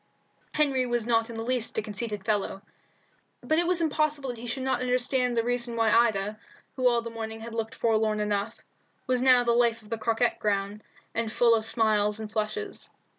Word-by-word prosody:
Henry 275 -4 +2
was 240 -2 -1
not 230 -1 +1
in 230 - -7
the 225 - -4
least 245 -1 -1
a - - +2
conceited 210 -1 -5
fellow, 205 -2 -1 0.8
but 315 +1 +2
it 345 - +1
was 355 -1 +3
impossible 305 -3 0
that 240 - -10
he 240 - -7
should 260 +2 -3
not 260 -2 0
understand 250 0 +1
the 230 - +3
reason 240 0 -1
why 225 -1 +2
Ida, 215 -2 +2 0.4
who 255 -1 +2
all 235 -1 +1
the 230 - -6
morning 225 -1 -6
had 230 0 -8
looked 225 -1 -3
forlorn 220 -2 +1
enough, 210 +1 -2 0.4
was 255 -1 +1
now 255 -1 +6
the 235 - +2
life 235 -1 +2
of 210 - -17
the 230 - -2
croquet 230 +2 +1
ground, 205 0 -1 0.3
and 225 -1 -1
full 235 0 +4
of 220 -1 +1
smiles 215 -2 +1
and 215 -1 -6
flushes. 230 - -3
230 Hz, 200 wpm, -27 LUFS, 220-250 Hz, 0.8 s, now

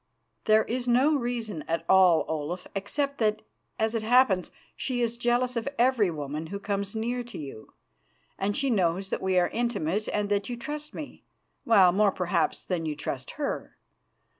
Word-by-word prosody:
"There 215 0 +5
is 245 +1 -3
no 260 +6 +4
reason 235 - -3
at 165 +1 -1
all, 185 -4 +5
Olaf, 160 +3 -3
except 280 +9 -2
that, 215 -1 +1 0.3
as 220 +1 0
it 225 - 0
happens, 220 -5 +3 0.3
she 255 -2 -2
is 235 -1 0
jealous 245 +1 +1
of 230 +3 -1
every 240 -5 +3
woman 150 0 -4
who 200 - -5
comes 200 0 -3
near 240 +3 -2
to 240 - -9
you, 135 -7 -9 0.6
and 200 +1 -1
she 275 -2 +1
knows 190 -2 +1
that - - -2
we 190 -1 +1
are 175 -1 +3
intimate 215 -5 -1
and 210 -1 -1
that 200 +1 0
you 240 - -4
trust 300 +4 -6
me 300 - -8 0.4
well, 195 -6 +6
more, 200 +2 +3
perhaps, 175 -3 0
than 170 -3 -2
you 150 - -2
trust 135 -3 -5
her. 295 -2 -4
210 Hz, 175 wpm, -27 LUFS, 180-240 Hz, 0.6 s, well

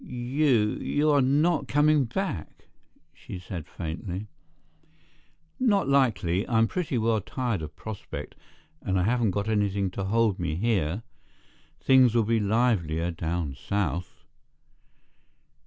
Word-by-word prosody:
"You—you 130 +2 +1
are 145 -1 +4
not 150 +5 +2
coming 145 -1 +3
back?" 120 - -5 0.4
she - - -9
said 90 -3 -7
faintly. 90 +4 -6 1.3
"Not 205 - +2
likely. 110 -10 +2
I'm 115 -2 +4
pretty 165 -6 -2
well 110 -1 +1
tired 120 -2 -2
of 75 -1 -7
Prospect 110 -2 -7 0.5
and 95 0 0
I - - +1
haven't 115 +2 +2
got 100 +2 -2
anything 100 -3 0
to 95 +1 -4
hold 110 -1 +1
me 80 -3 -2
here. 100 -1 0 0.8
Things'll 125 -3 +5
be 115 +1 +1
livelier 100 -7 +1
down 80 -3 -3
south." 85 +3 -3
110 Hz, 115 wpm, -27 LUFS, 90-130 Hz, 1.3 s, Things'll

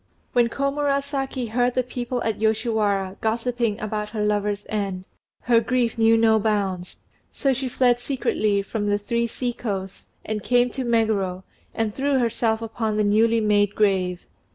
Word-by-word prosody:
When 240 -1 +3
Komurasaki 275 -1 -1
heard 245 +1 +1
the 255 - +2
people 245 0 -4
at 225 -1 -1
Yoshiwara 215 -3 0
gossiping 230 -1 -1
about 210 0 -3
her 210 -1 -2
lover's 205 -1 -1
end, 195 -3 -3 0.4
her 235 -1 +4
grief 240 0 0
knew 225 0 +4
no 220 -1 +4
bounds, 200 -4 -1 0.3
so 275 -1 +1
she 260 0 -2
fled 245 -1 +2
secretly 215 -6 0
from 205 0 -2
"The 205 - +2
Three 235 +3 -1
Sea 245 +1 -3
coasts," 195 -5 -5 0.2
and 215 -1 -3
came 245 0 +3
to 265 - -3
Meguro 215 -6 0 0.3
and 225 -2 -1
threw 275 +2 +1
herself 230 -2 0
upon 220 -1 -2
the 215 - +2
newly 225 +2 +3
made 205 -1 +2
grave. 185 -4 +1
225 Hz, 155 wpm, -23 LUFS, 205-245 Hz, 0.4 s, her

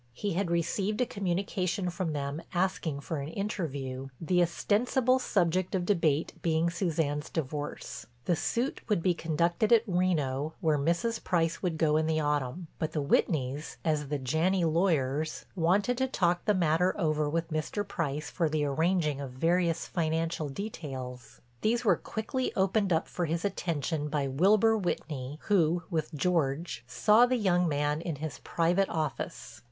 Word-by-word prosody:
He 200 +10 -2
had 180 +1 0
received 190 +5 0
a 250 - +3
communication 185 -1 -1
from 170 -2 -2
them 145 +2 -3
asking 175 -5 0
for 155 +1 -3
an 140 - -4
interview, 140 -9 -3
the 180 +2 +2
ostensible 245 +9 +2
subject 185 -5 +1
of 180 -2 0
debate 165 -6 +1
being 165 0 +1
Suzanne's 160 -4 -1
divorce. 150 -1 -4 0.2
The 175 - +2
suit 240 - -1
would 205 -6 +1
be 185 - +3
conducted 170 +6 0
at 230 -2 +6
Reno 160 - 0
where 155 -5 +2
Mrs. 170 +10 0
Price 165 -2 +1
would 175 -4 -1
go 155 -1 +3
in 155 0 +1
the 160 -1 +1
autumn, 150 +2 -1
but 160 0 -2
the 155 - 0
Whitneys, 140 0 0
as 150 -3 +1
the 145 +1 -1
Janney 165 +7 +1
lawyers, 155 -3 +1
wanted 195 +8 +2
to 265 - +2
talk 175 -7 +1
the 210 - +3
matter 180 +2 +2
over 155 -3 +1
with 165 +2 -2
Mr. 155 +6 -2
Price 155 -6 -3
for 165 -3 +1
the 150 -1 0
arranging 155 0 +1
of 140 - -5
various 165 +3 +1
financial 165 -2 -1
details. 135 - -7 0.2
These 235 +2 +1
were 195 -5 +5
quickly 240 - -3
opened 195 +1 +2
up 160 -1 +2
for 175 - -2
his 165 +3 -1
attention 160 -5 -1
by 145 -2 0
Wilbur 200 +11 +4
Whitney, 150 -8 -3
who, 175 -4 +2
with 160 -2 -1
George, 160 -3 0
saw 210 - +5
the 255 0 +1
young 180 -5 +2
man 145 +1 0
in 170 -2 -3
his 150 -1 -6
private 175 +4 +1
office. 155 -3 -4
165 Hz, 160 wpm, -29 LUFS, 150-185 Hz, 0.2 s, at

